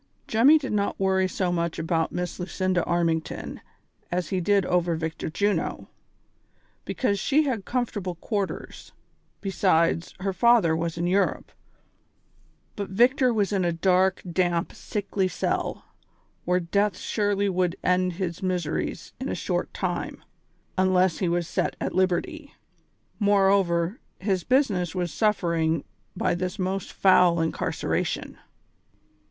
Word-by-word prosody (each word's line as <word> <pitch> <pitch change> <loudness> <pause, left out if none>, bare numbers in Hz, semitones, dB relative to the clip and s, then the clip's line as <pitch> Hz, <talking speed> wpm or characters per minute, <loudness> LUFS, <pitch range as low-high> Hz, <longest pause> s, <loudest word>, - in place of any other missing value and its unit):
Jemrny 260 +8 +6
did 270 -7 -4
not 205 -1 -1
worry 190 -1 +2
so 185 -1 -1
much 170 -1 -1
about 165 0 0
Miss 180 -1 -4
Lucinda 185 0 0
Armington 165 -2 -1 0.5
as 180 0 -1
he 185 -2 0
did 200 +1 +2
over 175 -2 +1
A^ictor 160 0 -4
Juno, 205 +4 -1 1.0
because 200 -6 0
she 295 +8 +3
had 240 -9 -2
comfortable 210 -8 -2
quarters, 200 +3 -4 0.5
besides, 170 -4 +1
her 195 0 -1
father 230 -7 +4
was 165 0 -2
in 170 - -1
Europe; 190 +3 0 1.2
but 200 -3 -4
Victor 250 +6 +4
was 210 -3 0
in 190 -2 +1
a 175 - +1
dark, 185 +2 +2
damp, 175 -1 0
sickly 200 -2 -2
cell, 180 - -2 0.6
where 180 +1 +2
death 200 +3 0
surely 205 -1 0
would 185 -2 0
end 180 0 +2
his 170 -2 -4
miseries 180 -4 -2
in - - -3
a - - -2
short - - -2
time, - - -3 0.6
unless 185 -2 +3
he 185 - 0
Avas 170 0 0
set - - -1
at - - -2
lil)erty; 285 - -1 0.7
moreover, 195 - +2 0.2
his 190 -2 -1
business 200 - +1
was 175 -2 -2
suffering 170 -7 +1 0.3
by 185 - +1
this 180 +1 -3
most 190 0 -2
foul 180 -3 +4
incarceration. 160 0 -2
185 Hz, 130 wpm, -25 LUFS, 175-200 Hz, 1.2 s, Jemrny